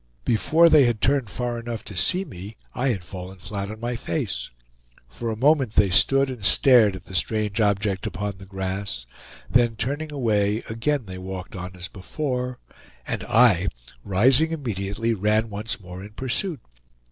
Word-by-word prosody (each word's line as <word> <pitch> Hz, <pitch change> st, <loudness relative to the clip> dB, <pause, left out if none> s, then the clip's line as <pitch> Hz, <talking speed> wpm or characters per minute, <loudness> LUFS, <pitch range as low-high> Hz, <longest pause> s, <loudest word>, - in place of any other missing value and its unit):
Before 160 Hz, +9 st, +4 dB
they 155 Hz, -4 st, +6 dB
had 120 Hz, -3 st, +1 dB
turned 135 Hz, -3 st, +1 dB
far 120 Hz, +3 st, -3 dB
enough 115 Hz, -1 st, -5 dB
to 105 Hz, -, -10 dB
see 180 Hz, -, +2 dB
me 100 Hz, -, -10 dB, 0.2 s
I 130 Hz, +2 st, -1 dB
had 105 Hz, -9 st, -1 dB
fallen 95 Hz, +1 st, -8 dB
flat 100 Hz, +2 st, -5 dB
on 110 Hz, 0 st, -8 dB
my 120 Hz, +1 st, -3 dB
face. 115 Hz, -, -3 dB, 0.6 s
For 115 Hz, -, -5 dB
a 110 Hz, -, -2 dB
moment 135 Hz, -2 st, +3 dB
they 100 Hz, -2 st, +4 dB
stood 135 Hz, +9 st, +5 dB
and 120 Hz, -5 st, -8 dB
stared 115 Hz, -2 st, +6 dB
at 90 Hz, -2 st, -10 dB
the -, -, -12 dB
strange 105 Hz, +4 st, 0 dB
object 100 Hz, -2 st, +1 dB
upon 100 Hz, -2 st, -4 dB
the 95 Hz, -, -12 dB
grass; 95 Hz, -8 st, -4 dB, 0.4 s
then 120 Hz, -2 st, +3 dB
turning 145 Hz, +8 st, -3 dB
away, 110 Hz, -5 st, +1 dB
again 120 Hz, +4 st, -1 dB
they 95 Hz, -1 st, -8 dB
walked 95 Hz, 0 st, -7 dB
on 90 Hz, 0 st, -7 dB
as 90 Hz, 0 st, -7 dB
before; 125 Hz, +5 st, -4 dB, 0.5 s
and -, -, -3 dB
I, 105 Hz, -6 st, +4 dB, 0.4 s
rising 125 Hz, +11 st, +4 dB
immediately, 115 Hz, -6 st, -2 dB
ran 110 Hz, +2 st, +1 dB
once 105 Hz, +3 st, -4 dB
more 90 Hz, -1 st, -9 dB
in 105 Hz, +1 st, -11 dB
pursuit. 135 Hz, -, -2 dB
110 Hz, 170 wpm, -24 LUFS, 95-125 Hz, 0.6 s, they